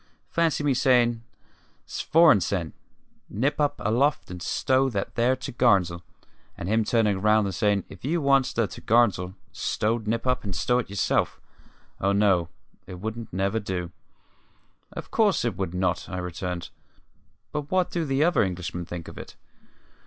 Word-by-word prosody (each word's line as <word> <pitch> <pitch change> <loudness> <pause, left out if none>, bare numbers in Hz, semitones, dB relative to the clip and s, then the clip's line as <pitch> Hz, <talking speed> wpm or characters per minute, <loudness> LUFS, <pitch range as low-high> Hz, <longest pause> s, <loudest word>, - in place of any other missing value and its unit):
Fancy 165 -3 +1
me 145 -2 +2
sayin': 120 -3 +3 0.7
`Svorenssen, 100 - +3 0.6
nip 135 +9 0
up 145 - +1
aloft 120 +1 0
and 90 -1 -7
stow 130 +8 +1
that 100 -5 -3
there 120 +2 +2
to'garns'l!' 100 -9 +1 0.6
and 85 - -5
him 110 +2 +2
turnin' 105 -3 +1
round 105 0 +4
and 95 - -3
sayin': 100 0 +1
`If 100 - -14
you 165 +6 0
wants 135 -3 +3
the 115 -2 0
to'garns'l 100 -6 +1 0.2
stowed, 110 0 -1
nip 115 +2 -1
up 125 0 +1
and 100 -3 -4
stow 125 +9 +1
it 120 - -4
yourself!' 100 -1 0 0.6
Oh 100 +1 +1
no; 95 -5 +3 0.4
it 95 - -7
wouldn't 110 +3 -5
never 100 +4 0
do." 90 -4 -4 1.0
"Of - - -8
course 205 - +2
it 120 - -1
would 95 -3 -3
not," 90 -1 -1
I 90 - -4
returned. 90 0 -5 0.8
"But 150 -1 -4
what 185 -1 +1
do 170 - -1
the 135 -1 +1
other 175 +2 +3
Englishmen 90 -2 -3
think 85 -1 -7
of - - -9
it?" - - -10
110 Hz, 155 wpm, -25 LUFS, 95-130 Hz, 1.0 s, round